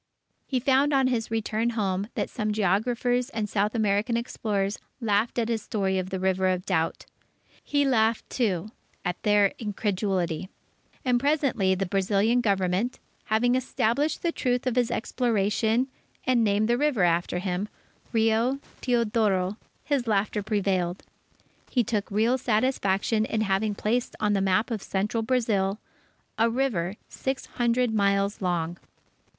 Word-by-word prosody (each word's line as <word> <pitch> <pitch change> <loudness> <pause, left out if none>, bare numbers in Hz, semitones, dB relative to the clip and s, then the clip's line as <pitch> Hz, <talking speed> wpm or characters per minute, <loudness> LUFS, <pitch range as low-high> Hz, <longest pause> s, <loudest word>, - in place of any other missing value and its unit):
He 260 - 0
found 270 +3 +3
on 270 -1 +4
his 240 -4 0
return 225 +1 0
home 195 -1 0
that - - -1
some 215 -3 -2
geographers 235 +5 +1
and 220 -5 -2
South 210 +2 0
American 215 +2 +1
explorers 205 -4 -2 0.2
laughed 220 0 +1
at 230 -2 +1
his 230 -2 -1
story 195 -3 -1
of 185 0 -4
the 190 - -3
River 190 0 +1
of 185 -1 0
Doubt. 165 -4 -1 0.6
He 285 -1 +1
laughed, 225 -4 +2
too, 210 -5 -1 0.4
at 180 0 -2
their 205 -2 +3
incredulity; 190 -5 -1 0.6
and 250 -1 +3
presently 270 -9 +2
the 195 +1 -1
Brazilian 200 +5 +2
Government, 195 +2 0 0.3
having 230 +3 +2
established 260 +3 0
the 340 - +1
truth 250 -5 -1
of 255 -2 0
his 245 -1 +2
exploration 225 0 +1 0.4
and 250 -2 +3
named 210 0 +2
the 240 +1 +2
river 285 -10 +2
after 175 0 +1
him, 185 +2 -2 0.4
Rio 225 +3 +2 0.2
Teodoro, 210 -5 +1 0.3
his 275 -5 0
laughter 210 0 +1
prevailed. 190 -4 -1 0.7
He 245 - +2
took 210 -2 -2
real 225 +5 +2
satisfaction 215 -3 +1
in 220 0 -1
having 205 +1 0
placed 235 +4 -1
on 210 -1 +1
the 195 - +1
map 195 +5 +1
of 220 -3 -2
Central 205 +5 -1
Brazil, 220 -5 +1 0.6
a 230 +1 +4
river 225 -8 -1
six 265 0 -3
hundred 240 -1 0
miles 200 0 +1
long. 175 -2 -1
215 Hz, 145 wpm, -26 LUFS, 195-240 Hz, 0.7 s, on